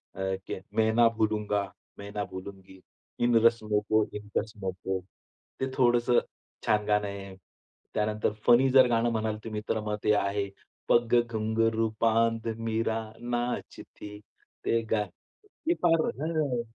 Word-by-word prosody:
अ, - - -6 0.3
की - - -3 0.2
"मैं 110 0 +3
ना 120 -1 +6
भूलूंगा, 105 -2 +1 0.3
मैं 100 0 -8
ना 105 - 0
भूलूंगी. 95 0 -9 0.4
इन 120 -1 +3
रस्मों 110 -3 +3
को, 110 0 +4
इन 105 0 -11
कसमों 105 -3 -5
को." 95 0 0 0.6
ते 130 - 0
थोडंसं 120 -1 +4 0.5
छान 105 -1 +2
गाणं 105 -1 +2
आहे. 100 -1 -7 0.6
त्यानंतर 105 0 0
फनी 125 +2 +6
जर 130 -1 +7
गाणं 120 0 +2
म्हणाल 110 -1 -1
तुम्ही 110 -1 -4
तर 110 - +1
मग 105 0 -1
ते 105 - +4
आहे, 100 0 0 0.4
"पग 120 0 +3
घुंघरू 115 0 0
बांध 115 0 +2
मीरा 115 0 -1 0.2
नाचती." 120 -3 -5 0.5
ते 115 0 +2
गा 105 -2 +3 0.6
ते 340 - +5
फार 165 -2 +5 0.2
हां. 155 -6 0
110 Hz, 140 wpm, -28 LUFS, 105-120 Hz, 0.6 s, जर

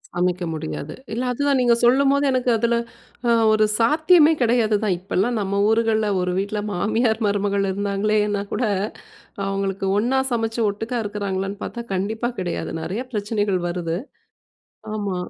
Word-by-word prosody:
சமைக்க 180 0 0
முடியாது. 155 -1 -5 0.2
இல்ல 240 +3 -2
அதுதான் 280 +2 +1
நீங்க 240 -1 +4
சொல்லும்போது 275 +3 +4
எனக்கு 255 -1 +1
அதுல 235 +2 +1 0.5
அ - - +5 0.2
ஒரு 215 0 +4
சாத்தியமே 315 +6 +5
கிடையாது 230 -2 +3
தான். 200 -4 +1
இப்பல்லாம் 200 +5 -1
நம்ம 200 0 -1
ஊர்கள்ல 220 -1 +2
ஒரு 180 - -1
வீட்ல 205 +2 -2
மாமியார், 220 +4 +1
மருமகள் 200 -1 0
இருந்தாங்களேன்னா 205 +1 0
கூட - - -1 0.8
அவுங்களுக்கு 195 0 -2
ஒன்னா 245 +5 +2
சமைச்சு 225 0 -1
ஒட்டுக்கா 225 +4 -3
இருக்கிறாங்களான்னு 200 -1 -3
பாத்தா 235 - -5
கண்டிப்பா 220 +5 -1
கிடையாது. 175 -1 -3
நெறைய 205 +10 -3
பிரச்சனைகள் 205 -2 0
வருது. 170 -1 -2 1.0
ஆமா. 200 -3 -2
210 Hz, 135 wpm, -22 LUFS, 195-235 Hz, 1.0 s, அ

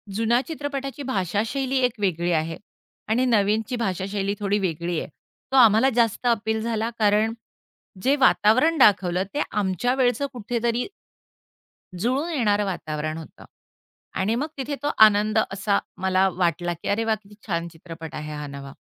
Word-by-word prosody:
जुन्या 230 +3 +2
चित्रपटाची 285 -3 -5
भाषाशैली 225 - -1
एक 245 -3 -3
वेगळी 175 -3 0
आहे 165 0 -1 0.5
आणि 240 +4 +2
नवीनची 220 0 +1
भाषाशैली 200 -2 -2
थोडी 205 0 0
वेगळी 170 -2 -2
आहे. - - -6 0.4
तो - - 0
आम्हाला 230 +1 +6
जास्त 235 0 +1
अपील 220 -1 +1
झाला 225 0 -1
कारण 215 +1 +3 0.7
जे 275 +2 +4
वातावरण 275 +4 +4
दाखवलं, 185 - +4
ते 295 - 0
आमच्या 210 +5 0
वेळचं 255 +1 +1
कुठेतरी 235 - -1 1.1
जुळून 265 - 0
येणारं 210 -7 +1
वातावरण 155 -4 -3
होतं 160 - -11 0.7
आणि 210 +4 +1
मग 280 +6 -1
तिथे 280 +2 -3
तो 290 - +1 0.2
आनंद 215 +1 +2
असा 200 +1 +1 0.2
मला 190 0 +3
वाटला, 175 -1 0
की 170 - -9
अरे 210 +3 +1
वाह! 220 -1 +2
किती 205 +1 -17
छान 170 -3 -1
चित्रपट 165 -1 -10
आहे 150 0 -6
हा 150 0 -5
नवा. 140 -1 -9
210 Hz, 145 wpm, -24 LUFS, 180-245 Hz, 1.1 s, आम्हाला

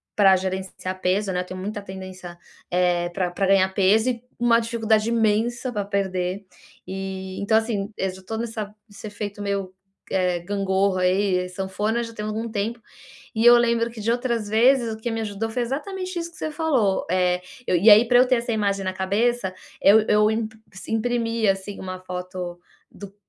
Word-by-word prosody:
pra 195 -2 +6
gerenciar 185 0 -4
peso, 190 +2 +1
né. 180 - 0
Eu - - -6
tenho 185 0 -7
muita 205 +2 -4
tendência 185 -2 -9 0.3
eh, 175 -1 +2
pra 180 0 -2
pra 195 +2 -1
ganhar 195 -1 +5
peso 210 +5 +3
e 240 -1 -3 0.2
u 240 - 0
uma 230 -1 +5
dificuldade 225 -1 +1
imensa 235 +2 +1
pra 205 -2 -1
perder. 195 -1 -2 0.4
E, 190 0 -5
então, 220 +2 +3
assim, 220 -2 -1
eu 190 - 0
já 190 0 -13
tô 220 +4 -5
nessa 220 -2 -4
nesse 205 0 -10
efeito 205 0 -6
meio, 200 -2 -2 0.4
eh, 180 -2 +1
gangorra, 190 0 0
aí, 185 0 +2
sanfona, 195 +5 -2
já 230 0 -8
tem 210 -1 -5
algum 220 +2 -3
tempo. 220 +2 -2 0.6
E 220 +1 0
eu 240 0 +10
lembro 235 -1 +2
que 230 -1 -10
de 220 +2 0
outras 235 -3 -1
vezes 235 +2 +4
o - - -8
que 235 +2 -3
me 225 0 -2
ajudou, 215 0 -3
foi 245 +2 -1
exatamente 365 - -4
isso 335 0 -4
que - - -18
você 310 - -3
falou. 285 - +1
Eh, 180 0 +2 0.3
eu - - +2
e 190 +6 +4
aí 215 +3 +8
para 245 0 +6
eu 250 - +6
ter 255 0 +3
essa 235 0 -3
imagem 200 -2 0
na 185 - -1
cabeça, 200 +2 0 0.3
eu 210 +3 +7
eu 210 0 +4
imp 220 0 -2 0.2
se 195 +3 -8
imprimia, 230 -2 +1
assim, 195 +1 -8
uma 185 -1 -5
foto 180 -1 -6 0.3
do 200 -1 -11
205 Hz, 195 wpm, -23 LUFS, 190-230 Hz, 0.6 s, eu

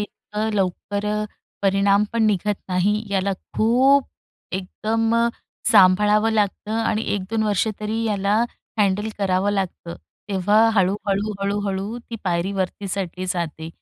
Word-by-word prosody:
इतकं 210 +1 -4
लवकर 200 +1 -1
अ, 210 0 0 0.4
परिणाम 200 +1 +3
पण 230 -1 +1
निघत 210 0 +1
नाही. 195 +4 +1
याला 195 0 +1 0.2
खूप 260 +5 +4 0.5
एकदम 220 +4 -1
अ, 235 0 +3 0.4
सांभाळावं 210 +2 +5
लागतं 210 0 -1
आणि 220 -1 0
1-2 205 +3 -2
वर्ष 210 -1 +1
तरी 220 +2 -2
याला 200 -2 +1 0.4
हँडल 205 +1 +2
करावं 195 0 +1
लागतं. 185 -3 -3 0.3
तेव्हा 200 +2 +2 0.2
हळू-हळू, 200 +2 +1
हळू-हळू 200 +2 -2
ती 230 - -4
पायरी 175 +2 0
वरती 195 +1 -3
चढली 185 -1 -3
जाते 165 -3 -3
205 Hz, 125 wpm, -22 LUFS, 190-215 Hz, 0.5 s, सांभाळावं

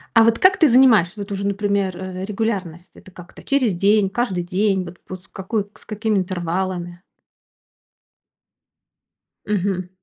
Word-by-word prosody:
А 230 - +7
вот 230 0 +3
как 370 0 +5
ты 330 -5 +5
занимаешься, 230 - +5
вот 200 +1 -6
уже, 200 0 -2
например, 200 -2 -1
э, 185 0 -6
регулярность? 195 -5 -4
Это - - -15
как-то 180 0 -13
через 260 -7 +1
день, 200 +2 +2
каждый 195 -5 -2
день? 190 +1 0
Вот 175 +1 -10
вот 185 -1 -8
с - - -21
какой 195 +2 -3
к 205 - -20
с - - -17
какими 215 0 -1
интервалами? 175 0 -3 2.4
Мгм. 190 -3 -1
195 Hz, 150 wpm, -21 LUFS, 180-215 Hz, 2.4 s, А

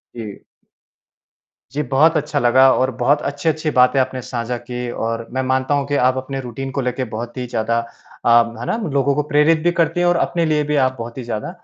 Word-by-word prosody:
जी। 110 -4 -7 1.3
जी, 150 - -1
बहुत 150 +5 +3
अच्छा 150 -1 -1
लगा 130 +2 +5
और 130 +1 +1
बहुत 145 +4 +2
अच्छी-अच्छी 155 +2 -1
बातें 125 +2 +5
आपने 130 0 -1
साझा 120 0 -4
की 125 0 -6 0.2
और 115 0 -3
मैं 130 - 0
मानता 130 +2 0
हूँ 140 -1 0
कि 145 - -1
आप 130 - -2
अपने 135 +1 -4
रूटीन 130 +2 -6
को - - +2
लेके 125 +1 -2
बहुत 120 +3 -6
ही 125 - -3
ज़्यादा 115 0 0 0.5
अ, - - +4 0.3
है 120 - -5
ना? 225 - -1 0.2
लोगों 140 0 +2
को 150 - +1
प्रेरित 155 +2 +4
भी 175 - +3
करते 165 +2 0
हैं 175 - +2
और 175 - +3
अपने 170 -1 0
लिए 150 -1 +1
भी - - +2
आप 130 - -5
बहुत 115 +2 -7
ही 130 - -5
ज़्यादा 110 +1 -4
130 Hz, 215 wpm, -19 LUFS, 120-150 Hz, 1.3 s, लगा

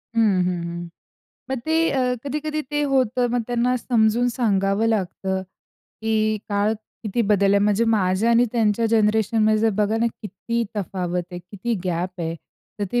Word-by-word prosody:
हं, 205 -5 +3
हं, 180 -1 -2
हं. 170 0 -6 0.6
मग 265 -2 -2
ते 320 0 0 0.2
अ, 255 -2 +1
कधी-कधी 305 +2 -2
ते 295 - +2
होतं 255 -2 +2
मग 245 -1 +1
त्यांना 245 +1 +1
समजून 235 0 +2
सांगावं 200 -2 +1
लागतं. 190 -3 -1 0.6
की 225 0 0 0.3
काळ 205 +1 +1 0.3
किती 220 +2 0
बदल 200 -1 +3
आहे, 200 - +5
म्हणजे 210 +2 +2
माझ्या 190 +3 +2
आणि 235 +1 +5
त्यांच्या 225 -1 +2
जनरेशनमध्ये 215 0 +3
जर 225 0 +3
बघा 210 +2 +1
ना, 235 - +2 0.2
किती 225 +4 -3
तफावत 180 -3 -2
आहे 175 - -6
किती 205 +6 -4
गॅप 180 +1 -2
आहे. 165 0 -2 0.4
तर 205 - 0
ते 245 - +2
215 Hz, 160 wpm, -22 LUFS, 190-235 Hz, 0.6 s, आहे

